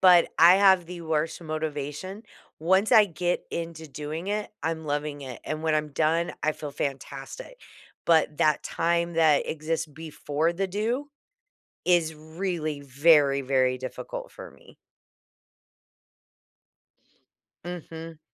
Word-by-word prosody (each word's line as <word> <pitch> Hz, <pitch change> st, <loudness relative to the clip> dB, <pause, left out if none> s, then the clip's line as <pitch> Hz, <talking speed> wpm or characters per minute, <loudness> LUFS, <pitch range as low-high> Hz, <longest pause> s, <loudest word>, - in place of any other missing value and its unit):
but 180 Hz, -2 st, +7 dB
I 175 Hz, +2 st, +9 dB
have 190 Hz, -3 st, +5 dB
the 175 Hz, -1 st, -8 dB
worst 160 Hz, +1 st, -1 dB
motivation, 155 Hz, +5 st, -4 dB, 0.4 s
once 190 Hz, +7 st, +3 dB
I 215 Hz, -2 st, +8 dB
get 175 Hz, +1 st, -2 dB
into 165 Hz, -1 st, -5 dB
doing 150 Hz, +4 st, -6 dB
it, 210 Hz, +1 st, -2 dB
I'm 160 Hz, 0 st, -2 dB
loving 145 Hz, 0 st, -2 dB
it, 130 Hz, -3 st, -8 dB
and 155 Hz, +1 st, -4 dB
when 160 Hz, -1 st, +2 dB
I'm 150 Hz, 0 st, 0 dB
done, 160 Hz, +3 st, +1 dB
I 155 Hz, 0 st, +2 dB
feel 150 Hz, -1 st, -7 dB
fantastic, 140 Hz, -, -5 dB, 0.5 s
but 160 Hz, -2 st, +3 dB
that 155 Hz, -1 st, +3 dB
time 170 Hz, 0 st, 0 dB
that 155 Hz, -3 st, +4 dB
exists 160 Hz, +1 st, -2 dB
before 155 Hz, +1 st, -2 dB
the 195 Hz, +2 st, -1 dB
do, 230 Hz, +9 st, -2 dB, 0.8 s
is 170 Hz, -3 st, +3 dB
really, 160 Hz, -1 st, -4 dB
very, 140 Hz, 0 st, +4 dB
very 130 Hz, -1 st, +2 dB
difficult -, -, -6 dB
for -, -, -10 dB
me. -, -, -19 dB, 2.9 s
Mhm. 165 Hz, -2 st, -8 dB
160 Hz, 125 wpm, -26 LUFS, 150-175 Hz, 2.9 s, I